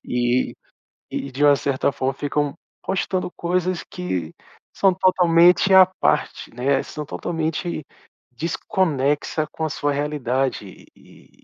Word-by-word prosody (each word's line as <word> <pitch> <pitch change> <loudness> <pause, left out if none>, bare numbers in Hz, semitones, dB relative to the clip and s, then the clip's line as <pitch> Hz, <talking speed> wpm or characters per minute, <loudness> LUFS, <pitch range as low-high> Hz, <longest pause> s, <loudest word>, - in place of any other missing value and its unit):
E 125 +1 0 0.6
e 140 - -4
de 140 +3 -1
uma 145 -1 +7
certa 140 0 0
forma 130 +1 -1
ficam 145 +1 -1 0.3
postando 190 -1 -1
coisas 180 +1 -1
que 90 - -4 0.4
são 195 -2 +3
totalmente 180 0 +4
à 190 -1 +9 0.2
parte, - - 0
né, 135 +2 +1
são 150 -1 -7
totalmente 160 0 -3 0.5
desconexa 155 -1 -1
com 160 - -5
a - - -2
sua 145 0 -1
realidade. 135 -5 -1 0.3
E - - -21
150 Hz, 120 wpm, -22 LUFS, 135-175 Hz, 0.6 s, à